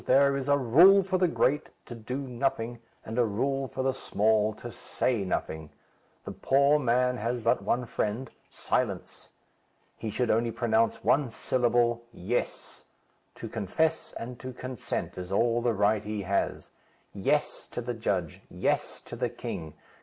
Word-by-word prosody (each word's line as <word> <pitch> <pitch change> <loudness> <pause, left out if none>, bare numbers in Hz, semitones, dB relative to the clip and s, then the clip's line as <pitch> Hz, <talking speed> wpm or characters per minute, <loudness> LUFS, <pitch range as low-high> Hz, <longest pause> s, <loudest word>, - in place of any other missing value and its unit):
There 140 +1 +5
is 140 0 -3
a 140 - +5
rule 170 - +7
for 185 0 0
the 180 - +4
great 150 -3 +1 0.2
to - - -8
do 120 +3 -5
nothing; 120 -3 -2 0.3
and 115 +3 -3
a - - +6
rule 135 +5 -1
for 130 - -4
the 135 0 +1
small 110 -3 +2
to 120 +2 -8
say 115 -3 -1
nothing. 80 -4 -3 0.6
The - - -5
poor 140 +2 +3
man 125 -1 +2
has 120 +2 -1
but 115 0 +2
one 125 +1 0
friend, 115 +3 -2 0.2
silence. - - -2 0.7
He 110 - -5
should 120 +3 0
only 115 +2 +2
pronounce 115 -1 +1
one 140 -2 +3
syllable: 120 0 +1
'Yes.' 115 +4 -4 0.5
To - - -7
confess 155 - -1
and 120 +1 -7
to 130 0 -7
consent 130 -6 -4
is 90 +1 -7
all 115 +4 +2
the 120 -2 +1
right 105 +1 +2
he 105 -1 -4
has. 100 +1 -1 0.4
'Yes,' - - 0
to - - -6
the - - -3
judge; - - -2
'yes,' - - -1
to - - -9
the - - -1
king. 80 -2 -6
120 Hz, 160 wpm, -28 LUFS, 110-135 Hz, 0.7 s, rule